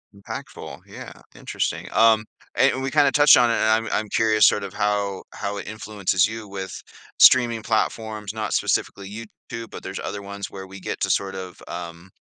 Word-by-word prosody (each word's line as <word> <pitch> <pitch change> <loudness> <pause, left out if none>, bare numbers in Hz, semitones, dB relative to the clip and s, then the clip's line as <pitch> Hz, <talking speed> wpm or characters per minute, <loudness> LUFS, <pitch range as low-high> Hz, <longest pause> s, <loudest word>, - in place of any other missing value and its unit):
Impactful. 100 - -8
Yeah. - - -10 0.2
Interesting. - - -3
Um, 110 -1 +4 0.3
and 130 - +3
we 135 - -1
kinda 145 -3 +4
touched 145 +1 +7
on 120 - +4
it, - - +2
and 110 0 +2
I'm - - -4
I'm 110 -1 -1
curious 110 -1 +4
sort 105 - +2
of 100 - -7
how 100 -2 -1
how 100 0 -4
it - - -7
influences 100 -4 0
you 110 -1 -7
with 95 -1 -7 0.4
streaming 120 -3 +6
platforms, 110 -1 -2
not 110 -1 -3
specifically 100 -1 -1
YouTube, 115 +1 -9
but - - -9
there's 95 +1 -6
other 100 - -5
ones 100 0 -6
where 95 -1 -8
we 95 +1 -11
get - - -5
to - - 0
sort 95 -1 -1
of, 95 -2 -8
um, 85 +1 -8
105 Hz, 185 wpm, -23 LUFS, 100-110 Hz, 0.4 s, touched